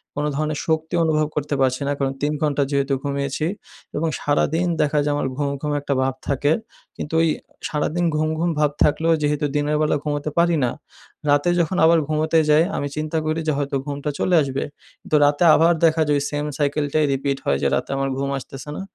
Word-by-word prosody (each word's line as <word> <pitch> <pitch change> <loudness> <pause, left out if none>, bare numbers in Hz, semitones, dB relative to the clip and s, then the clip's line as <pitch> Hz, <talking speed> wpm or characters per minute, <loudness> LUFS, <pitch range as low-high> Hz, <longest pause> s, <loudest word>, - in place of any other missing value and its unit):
কোনো 145 +1 -1
ধরনের 155 0 -1
শক্তি 160 +1 -1
অনুভব 155 -1 +2
করতে 150 0 -1
পারছি 130 +1 +1
না। - - +1
কারণ 135 -1 -1
৩ 145 +1 0
ঘণ্টা 145 -2 +1
যেহেতু 140 0 +1
ঘুমিয়েছি 140 +1 -2 0.5
এবং 165 +2 0
সারাদিন 160 +4 +1
দেখা 150 0 +2
যায় 145 0 0
আমার 140 - -1
ঘুম, 145 -1 0
ঘুম 150 - -2
একটা 140 0 -1
ভাব 135 0 0
থাকে। 145 +1 +1 0.5
কিন্তু 150 - -4
ঐ - - +4 0.4
সারাদিন 160 +3 -1
ঘুম, 155 +1 +1
ঘুম 170 +1 +1
ভাব 150 -1 +3
থাকলেও 165 +2 +2
যেহেতু 150 0 +1
দিনের 145 +1 +1
বেলা 155 0 +2
ঘুমোতে 145 0 -2
পারি 170 0 +4
না। 120 - +1 0.6
রাতে 145 +4 +3
যখন 170 +2 0
আবার 165 0 +5
ঘুমোতে 155 +1 +2
যাই, 150 +2 +6
আমি 145 - -2
চিন্তা 155 +1 -2
করি 155 +1 0
যে - - +3
হয়তো 140 -1 -2
ঘুমটা 145 0 -4
চলে 180 - +2
আসবে। 135 -1 -2 0.5
তো - - +4
রাতে 145 +3 +2
আবার 165 +2 +4
দেখা 160 0 +3
যায় 145 - +2
ওই - - -3
সেইম 145 0 -2
সাইকেলটাই 150 +1 +1
রিপিট 140 0 -1
হয় 70 - +2
যে - - +2
রাতে - - -3
আমার 135 0 -1
ঘুম 140 0 -2
আসতেছে 135 +2 -9
না। - - -4
150 Hz, 205 wpm, -22 LUFS, 140-155 Hz, 0.6 s, যাই